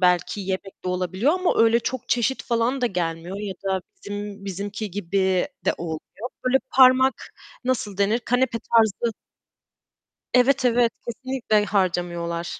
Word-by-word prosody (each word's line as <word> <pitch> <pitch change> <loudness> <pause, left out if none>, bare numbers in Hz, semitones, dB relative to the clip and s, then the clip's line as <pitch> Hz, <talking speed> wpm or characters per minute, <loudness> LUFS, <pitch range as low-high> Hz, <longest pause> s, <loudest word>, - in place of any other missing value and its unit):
belki 180 +2 +2
yemek 190 0 -5
de - - -1
olabiliyor 185 - +1
ama 365 -1 +1
öyle 230 +1 +5
çok 255 +1 -4
çeşit 245 +2 +1
falan 240 +3 0
da 245 - +3
gelmiyor 175 -2 -3
ya 200 -2 -4
da 190 -1 0 0.2
bizim 205 0 -7
bizimki 200 +2 -4
gibi 190 0 0 0.2
de - - +2
olmuyor. 170 +8 -6 0.2
Böyle 260 +1 +4
parmak 260 0 +6 0.5
nasıl 230 -6 -1
denir, 205 +3 +3
kanepe 245 0 0
tarzı 225 0 +2 1.2
Evet, 255 +1 +4
evet, 240 -1 +3
kesinlikle 235 -3 0
harcamıyorlar. 175 -3 -1
205 Hz, 135 wpm, -24 LUFS, 185-245 Hz, 1.2 s, parmak